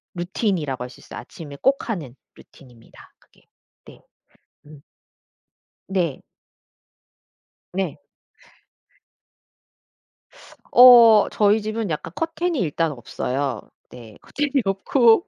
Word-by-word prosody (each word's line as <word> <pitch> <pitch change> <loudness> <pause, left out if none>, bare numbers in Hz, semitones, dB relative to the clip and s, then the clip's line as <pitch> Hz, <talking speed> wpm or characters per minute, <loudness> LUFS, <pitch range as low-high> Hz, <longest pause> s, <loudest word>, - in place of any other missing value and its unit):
루틴이라고 175 - -2
할 125 - -8
수 125 - -16
있어요. - - -10
아침에 145 -4 -11
꼭 275 -1 +1
하는 155 - -5 0.2
루틴입니다 120 -4 -19
그게. - - -29 0.4
네. - - -16 0.7
음. 150 -1 -15 1.1
네. 180 -7 -2 1.5
네. 185 -4 -3 2.7
어 235 -4 +8
저희 210 +1 +2
집은 215 -1 -4
약간 155 +1 -5
커튼이 325 -1 -2
일단 165 -1 -1
없어요. 130 0 -4 0.3
네. 115 -4 -13
커튼이 285 -3 -2
없고 230 - +2
190 Hz, 190 characters per minute, -22 LUFS, 140-230 Hz, 2.7 s, 어